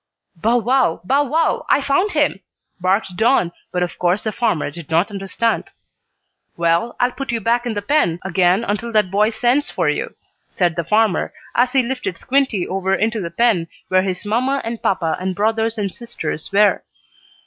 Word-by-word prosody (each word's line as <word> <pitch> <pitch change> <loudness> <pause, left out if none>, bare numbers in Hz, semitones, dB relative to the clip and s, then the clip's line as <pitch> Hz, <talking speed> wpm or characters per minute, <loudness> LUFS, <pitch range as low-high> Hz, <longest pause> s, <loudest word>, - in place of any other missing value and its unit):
"Bow 225 +8 +2
wow! 245 -6 +2
Bow 275 +10 +2
wow! 320 +5 +1
I - - +5
found 285 +9 +1
him," 295 -9 +1 0.4
barked 185 +1 0
Don, 220 -6 +3 0.2
but 180 0 0
of 175 - -5
course 180 +3 +1
the 220 - -1
farmer 210 -10 -1
did 165 -1 -10
not 165 +6 +2
understand. 200 +3 -2 0.8
"Well, 170 +7 +1
I'll 245 +1 +2
put 270 0 -5
you 235 - -1
back 235 +3 0
in 225 - -2
the 205 - -3
pen 205 - +2
again 185 +2 +2
until 210 +3 -2
that 210 -4 +2
boy 210 +2 +3
sends 245 +5 +1
for - - 0
you," - - -3 0.4
said 175 -3 +1
the 170 - -1
farmer, 210 +3 +1 0.2
as 250 +1 +2
he 265 -2 +4
lifted 250 -7 -3
Squinty 260 -9 0
over 190 0 0
into 220 +2 0
the 170 - -4
pen 180 -2 +1 0.2
where 185 0 +4
his 185 0 -3
mamma 255 +6 +1
and 230 0 -4
papa 165 -4 0
and 185 0 -3
brothers 225 +2 0
and 200 -3 -2
sisters 205 -10 -6
were. 205 +1 +4
210 Hz, 180 wpm, -19 LUFS, 185-240 Hz, 0.8 s, I